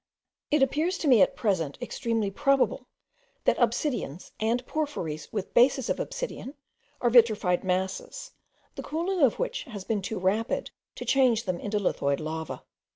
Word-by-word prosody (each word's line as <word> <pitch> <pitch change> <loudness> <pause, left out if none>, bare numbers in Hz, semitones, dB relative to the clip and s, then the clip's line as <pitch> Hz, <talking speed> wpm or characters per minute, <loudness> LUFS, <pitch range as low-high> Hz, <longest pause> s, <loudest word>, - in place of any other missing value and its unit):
It 295 -2 +4
appears 310 +7 +1
to 315 - -2
me 245 -7 +6
at - - +4
present 170 - -1
extremely 225 -5 -2
probable, 270 +3 +1 0.6
that - - +2
obsidians, 235 - -1
and 235 +3 0
porphyries 180 - -3
with 205 -4 -4
bases 255 +1 +4
of - - -2
obsidian, 320 - -5 0.5
are 240 - +2
vitrified 215 -7 +4
masses, 190 - -3 0.4
the - - -6
cooling 345 +3 -2
of 265 -5 +4
which - - -3
has 215 -8 -7
been 215 -1 -1
too 205 +3 -4
rapid 200 +5 0 0.2
to - - -6
change 250 -4 +3
them 180 -2 -2
into 210 0 -2
lithoid 140 -8 0
lava. 160 +1 -5
230 Hz, 155 wpm, -27 LUFS, 190-275 Hz, 0.6 s, me